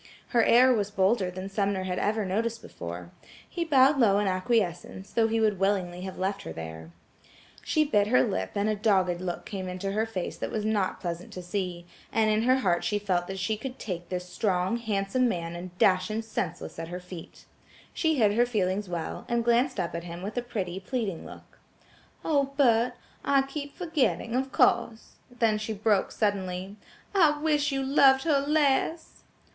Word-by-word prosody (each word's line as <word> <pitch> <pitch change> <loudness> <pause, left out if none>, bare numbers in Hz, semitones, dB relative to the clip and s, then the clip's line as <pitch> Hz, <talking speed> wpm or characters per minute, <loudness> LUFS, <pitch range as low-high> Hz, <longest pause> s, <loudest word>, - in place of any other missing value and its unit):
Her 235 -3 +3
air 250 +3 +6
was 205 -3 0
bolder 195 0 +2
than 185 +1 -6
Sumner 195 -1 -1
had 185 -1 -2
ever 215 0 0
noticed 225 +4 -2
before. 85 +1 -8 0.4
He 345 - -3
bowed 275 -2 +4
low 205 -5 +5
in 205 - +1
acquiescence, 190 -1 -1
though 225 -1 +3
he 225 0 0
would 210 -4 +2
willingly 190 -3 0
have 190 0 -6
left 195 +2 -2
her - - -7
there. 80 0 -8 0.7
She 310 - +2
bit 210 -8 +2
her 130 -10 +4
lip 95 -6 -2
and 200 +1 +1
a 215 - +1
dogged 190 -4 +1
look 180 -1 -4
came 190 -2 -5
into 185 +2 -3
her 220 +3 0
face 190 -5 -4
that - - -4
was 215 -1 -3
not 210 -3 0
pleasant 175 0 -5
to 180 - -7
see, 175 -2 -3 0.3
and 220 -1 +2
in 215 +1 +2
her 255 +3 +4
heart 175 -5 +1
she 210 - 0
felt 185 -4 -1
that 195 - -5
she 190 +4 -1
could 255 +4 -7
take 175 -4 -5
the 180 - -1
strong, 180 +2 -1
handsome 220 +2 0
man 170 -4 -3
and 180 +1 -8
dash 185 0 +3
him 220 +1 -2
senseless 175 -7 -4
at 165 - -5
her 175 +2 -5
feet. 180 -2 -11 0.5
She 320 -2 +1
hid 215 -6 +3
her 240 +3 +3
feelings 200 -3 -1
well, 170 -2 -4
and 235 -1 0
glanced 240 +3 +2
up 170 - -2
at 170 0 -5
him 170 +1 -7
with 205 +2 -5
a 245 - 0
pretty 190 -7 -4
pleading 200 -3 -3
look. - - -14 0.7
"Oh! 280 -3 +1
Bert, 240 -3 +4 0.3
I 275 -1 +3
keep 285 +1 -7
forgetting–of 265 -6 0
course–," 225 -1 +1
then 230 -3 +1
she 215 +1 -3
broke 210 -1 +1
suddenly, 190 -2 -2 0.4
"I 310 -6 +4
wish 295 -1 +1
you 270 0 -1
loved 265 -1 +5
her 300 -4 +3
less!" 295 +2 0
205 Hz, 190 wpm, -27 LUFS, 185-240 Hz, 0.7 s, air